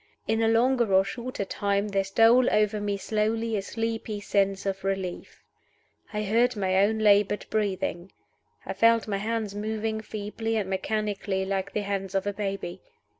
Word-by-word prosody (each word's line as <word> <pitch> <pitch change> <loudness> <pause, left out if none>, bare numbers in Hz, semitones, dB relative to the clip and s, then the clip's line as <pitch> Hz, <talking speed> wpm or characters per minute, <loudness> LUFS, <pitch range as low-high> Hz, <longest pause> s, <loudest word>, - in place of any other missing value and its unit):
In 220 0 +1
a 225 - +3
longer 235 0 +3
or 190 0 +5
shorter 235 0 -4
time 200 +1 -1
there 195 -1 +1
stole 230 +5 +5
over 210 0 +2
me 205 -1 -1
slowly 220 +2 -1
a 200 - 0
sleepy 225 0 -3
sense 195 -1 0
of 195 -1 -2
relief. 195 -2 -4 0.7
I 210 -1 -2
heard 235 +4 +2
my 190 -2 0
own 220 +2 +2
labored 205 -1 +3
breathing. 195 -4 -2 0.5
I - - -3
felt 230 0 +4
my 200 -2 -1
hands 215 0 -2
moving 220 +1 -2
feebly 220 +1 -4
and 205 -3 -1
mechanically, 195 0 -2
like 195 0 -2
the 210 - 0
hands 195 -1 -3
of 195 - +1
a 205 - -1
baby. 195 -3 -4
205 Hz, 165 wpm, -27 LUFS, 195-225 Hz, 0.7 s, or